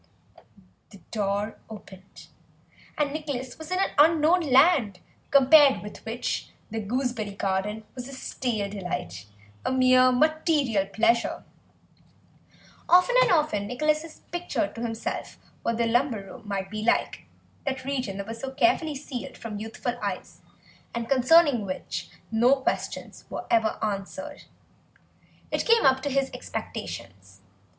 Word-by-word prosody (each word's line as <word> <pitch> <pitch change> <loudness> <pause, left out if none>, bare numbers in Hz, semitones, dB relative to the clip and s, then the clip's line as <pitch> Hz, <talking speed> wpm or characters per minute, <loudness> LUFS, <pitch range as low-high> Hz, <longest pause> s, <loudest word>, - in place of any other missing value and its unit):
The 200 - -14
door 205 0 -2
opened, 195 -3 -12 0.7
and 290 -1 0
Nicholas 280 -5 -4
was 315 - -8
in 365 - 0
an 390 - +1
unknown 320 +3 +5
land, 270 - +4 0.3
compared 280 -1 +6
with 210 - -10
which 235 +2 -3 0.2
the 225 - -2
gooseberry 220 -2 -2
garden 200 +3 -2
was 250 -1 -7
a 275 - -9
stale 240 -5 -3
delight, 140 - -5 0.4
a - - -1
mere 255 0 +5
material 290 - +2
pleasure. 230 +3 +1 1.5
Often 365 +8 +5
and - - +4
often 300 - +1
Nicholas 305 +6 +1
had 325 -1 -10 0.2
pictured 350 -3 -2
to 230 - -7
himself 225 -1 -4 0.2
what 230 - -1
the 235 - +2
lumber 235 -2 +1
room 220 +3 -12
might 195 -1 -3
be 215 0 -4
like, 225 - 0 0.4
that 265 -1 -3
region 255 -8 -2
that 200 - -4
was 225 +2 -7
so 270 - -4
carefully 290 +4 +2
sealed 270 -3 -7
from 215 -3 -6
youthful 225 +3 -4
eyes - - -5 0.5
and 235 -1 -3
concerning 275 -1 +5
which 185 -2 -5 0.2
no 240 +4 +5
questions 265 - -4
were - - -5
ever 225 -1 +2
answered. 215 +9 -4 1.1
It - - 0
came 460 -1 +4
up 265 0 +4
to 285 - -2
his 275 0 0
expectations. 95 0 -7
250 Hz, 135 wpm, -26 LUFS, 210-290 Hz, 1.5 s, compared